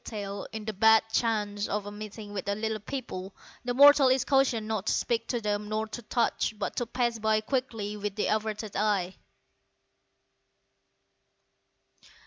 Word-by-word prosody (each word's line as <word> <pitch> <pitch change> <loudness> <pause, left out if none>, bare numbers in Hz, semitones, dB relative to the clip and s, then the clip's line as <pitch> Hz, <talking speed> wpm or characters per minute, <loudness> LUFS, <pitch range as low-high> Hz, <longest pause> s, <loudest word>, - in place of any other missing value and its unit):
* - - -9
In 205 0 -6
the 220 - -3
bad 220 +2 +5
chance 210 -3 0
of 210 0 -2
a 205 - -6
meeting 210 0 -8
with 195 -3 -4
the 200 - 0
"Little 220 0 -2
People" 200 -5 -6 0.3
the 245 0 -2
mortal 285 0 +8
is 260 0 +3
cautioned 265 -6 +2
not 220 -2 -2
to - - +3
speak 230 -1 -1
to 240 - -1
them 210 -1 -2
nor 215 +1 -1
to 240 - -6
touch, 230 -1 0
but 205 - -3
to 240 - -1
pass 235 -1 -1
by 220 0 +2
quickly 225 -4 -2
with 210 0 -4
averted 215 0 -1
eye. 195 -4 +1
215 Hz, 155 wpm, -28 LUFS, 205-235 Hz, 0.3 s, mortal